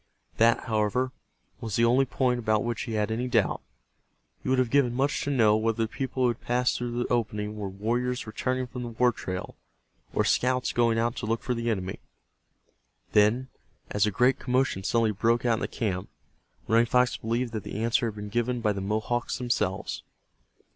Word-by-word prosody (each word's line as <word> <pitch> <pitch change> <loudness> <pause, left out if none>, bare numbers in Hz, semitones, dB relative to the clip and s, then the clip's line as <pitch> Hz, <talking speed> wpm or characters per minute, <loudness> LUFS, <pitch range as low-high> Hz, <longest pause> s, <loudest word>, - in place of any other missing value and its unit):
That, 115 +1 +4
however, 115 +4 0 0.5
was 110 -3 -4
the 115 - +4
only 125 +3 +4
point 125 -1 0
about 110 -2 +1
which 120 -2 -2
he 115 - -5
had 105 0 0
any 120 +3 -1
doubt. 115 -5 +1 0.8
He - - -4
would 130 - +3
have 130 -2 +1
given 130 -4 +3
much 135 +3 +1
to - - -2
know 115 -6 +4
whether 115 +1 +1
the - - -1
people 130 +2 -3
who 125 - +4
had 120 - -4
passed 125 +1 +1
through 120 -1 -3
the - - -2
opening 105 -3 -1
were 105 -2 -4
warriors 120 +6 -1
returning 130 +4 -2
from 125 0 -7
the 120 - -4
war 120 +2 +3
trail, 95 -5 -6 0.6
or - - +1
scouts 125 0 +1
going 115 -1 +2
out 115 +2 0
to 110 - -4
look 115 +1 -1
for 125 - 0
the 115 0 -2
enemy. 95 -4 -2 1.1
Then, 110 +5 +3 0.4
as 105 0 +2
a - - +3
great 125 +6 +2
commotion 125 -6 0
suddenly 115 +1 +2
broke 115 +4 +1
out 115 -2 +3
in - - -4
the - - -2
camp, 95 -5 -3 0.6
Running 115 +2 +4
Fox 125 +1 +3
believed 115 +1 -2
that 110 - -2
the 110 +3 -5
answer 115 +1 +2
had 110 - -5
been 105 0 -6
given 120 +3 0
by 105 -2 +1
the 100 - -4
Mohawks 110 +4 -1
themselves. 105 -6 -1
115 Hz, 195 wpm, -27 LUFS, 110-125 Hz, 1.1 s, That